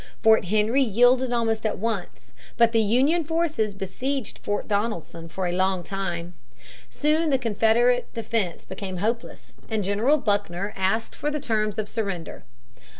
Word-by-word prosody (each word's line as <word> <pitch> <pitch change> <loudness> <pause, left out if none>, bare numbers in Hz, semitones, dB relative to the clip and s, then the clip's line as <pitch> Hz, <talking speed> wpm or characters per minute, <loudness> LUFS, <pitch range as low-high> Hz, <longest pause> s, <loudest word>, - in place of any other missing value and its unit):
Fort 220 -2 +5
Henry 215 +7 +2
yielded 245 +2 +4
almost 225 -2 0
at 215 - -1
once, 215 -3 -4 0.3
but 235 -1 +5
the 225 -1 +3
Union 265 +11 +3
forces 310 -10 -1
besieged 245 +7 -3
Fort 205 0 -3
Donelson 200 -6 -2
for 190 +2 -3
a 175 - 0
longer 185 -1 0
time. 175 -3 -4 0.6
Soon 305 - +1
the 270 - +3
Confederate 235 +1 +2
defense 220 -6 -2
became 190 0 -6
hopeless, 230 +5 -3 0.2
and 220 -2 0
General 215 +10 +2
Buckner 200 - -1
asked 195 +4 0
for 295 - -2
the 300 0 -2
terms 215 -6 -1
of 215 -1 -2
surrender. 195 - -4
220 Hz, 150 wpm, -25 LUFS, 195-245 Hz, 0.6 s, Fort